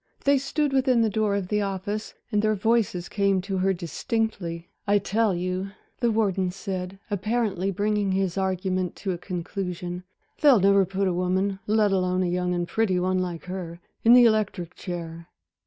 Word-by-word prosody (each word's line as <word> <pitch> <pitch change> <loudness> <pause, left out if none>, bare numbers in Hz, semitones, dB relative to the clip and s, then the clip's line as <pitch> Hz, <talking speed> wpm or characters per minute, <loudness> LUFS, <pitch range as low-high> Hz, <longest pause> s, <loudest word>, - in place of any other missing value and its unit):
They 280 -1 +4
stood 280 +1 -1
within 255 -3 +3
the 220 - +1
door 210 -1 +1
of 195 -3 -3
the 210 0 +1
office, 200 +2 -3 0.2
and 210 -2 +2
their 215 0 +2
voices 210 -4 +1
came 200 -2 +1
to 195 0 -3
her 190 +1 +2
distinctly. 175 -1 -3 0.2
"I 205 +1 +4
tell 205 0 +1
you," 185 +2 -3 0.3
the 240 -2 +2
warden 195 -4 +1
said, 185 0 -5
apparently 205 -2 0
bringing 205 +1 0
his 190 -2 0
argument 185 -1 -1
to 195 - -3
a 175 - -4
conclusion, 180 -1 -4 0.4
"they'll 285 -7 +7
never 195 0 +4
put 195 0 0
a 185 - +1
woman 185 +2 0
let 210 -1 +3
alone 185 -1 +1
a - - 0
young 180 0 0
and 175 0 -1
pretty 200 -4 +1
one 185 +1 +1
like 175 -2 -3
her 180 -2 -6 0.2
in 230 - +7
the 245 -1 +8
electric 210 -6 +1
chair." 170 -2 -6
195 Hz, 175 wpm, -25 LUFS, 180-215 Hz, 0.4 s, the